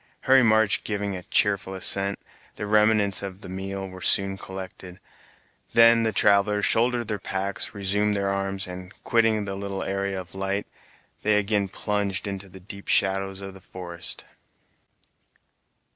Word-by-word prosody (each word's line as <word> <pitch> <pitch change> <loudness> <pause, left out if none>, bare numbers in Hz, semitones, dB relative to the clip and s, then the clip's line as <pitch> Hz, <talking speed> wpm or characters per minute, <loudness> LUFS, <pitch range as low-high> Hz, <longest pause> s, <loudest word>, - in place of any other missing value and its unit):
Harry 130 0 +5
March 110 -3 +3
giving 100 -2 -3
a 90 - -6
cheerful 100 0 +1
assent, 100 +1 +2 0.4
the - - -5
remnants 105 -1 +3
of 100 -1 -7
the - - -8
meal 95 +1 -5
were 95 0 -11
soon 95 +1 +3
collected; 95 -1 -9 0.7
then 115 0 +7
the 110 -1 +1
travelers 100 +1 +3
shouldered 120 0 +2
their 105 -2 -3
packs, 95 +2 -3
resumed 100 +1 +1
their 100 -1 0
arms, 100 0 -2
and, 90 0 -9
quitting 115 -3 +2
the 95 - -4
little 100 0 -4
area 100 0 -2
of 90 - -10
light, 95 +1 -2 0.6
they 105 0 +3
again 105 -1 +1
plunged 100 -1 -2
into 100 -1 -6
the 95 +1 -13
deep 100 +2 -11
shadows 95 0 +2
of 95 0 -8
the 95 - -14
forest. 85 -2 -8
100 Hz, 150 wpm, -25 LUFS, 95-105 Hz, 0.7 s, then